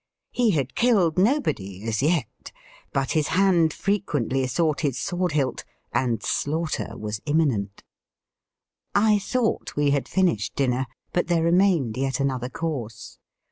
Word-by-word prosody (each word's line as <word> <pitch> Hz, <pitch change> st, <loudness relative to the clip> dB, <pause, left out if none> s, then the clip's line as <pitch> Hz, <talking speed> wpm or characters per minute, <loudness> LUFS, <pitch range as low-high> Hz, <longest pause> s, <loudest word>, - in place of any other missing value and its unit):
He 245 Hz, -2 st, +2 dB
had 140 Hz, -, 0 dB
killed 190 Hz, -9 st, +3 dB
nobody 145 Hz, -, 0 dB
as 110 Hz, 0 st, 0 dB
yet, 150 Hz, -5 st, -1 dB, 0.4 s
but 135 Hz, -1 st, -1 dB
his 155 Hz, -2 st, +1 dB
hand 180 Hz, -5 st, +4 dB
frequently 145 Hz, -, -1 dB
sought 150 Hz, +1 st, 0 dB
his 135 Hz, -4 st, 0 dB
sword 180 Hz, -2 st, -1 dB
hilt, 135 Hz, -4 st, -1 dB, 0.3 s
and 120 Hz, -4 st, 0 dB
slaughter 155 Hz, +2 st, -2 dB
was 105 Hz, -1 st, -5 dB
imminent. 130 Hz, -11 st, 0 dB, 1.1 s
I 210 Hz, 0 st, +4 dB
thought 235 Hz, +3 st, -1 dB
we 145 Hz, -1 st, +2 dB
had 140 Hz, -1 st, 0 dB
finished 140 Hz, -, 0 dB
dinner, 130 Hz, -1 st, 0 dB, 0.3 s
but 175 Hz, -, +1 dB
there 170 Hz, -2 st, +2 dB
remained 170 Hz, -, +2 dB
yet 135 Hz, 0 st, -1 dB
another 130 Hz, -3 st, -1 dB
course. 130 Hz, -7 st, -5 dB
145 Hz, 135 wpm, -24 LUFS, 130-180 Hz, 1.1 s, hand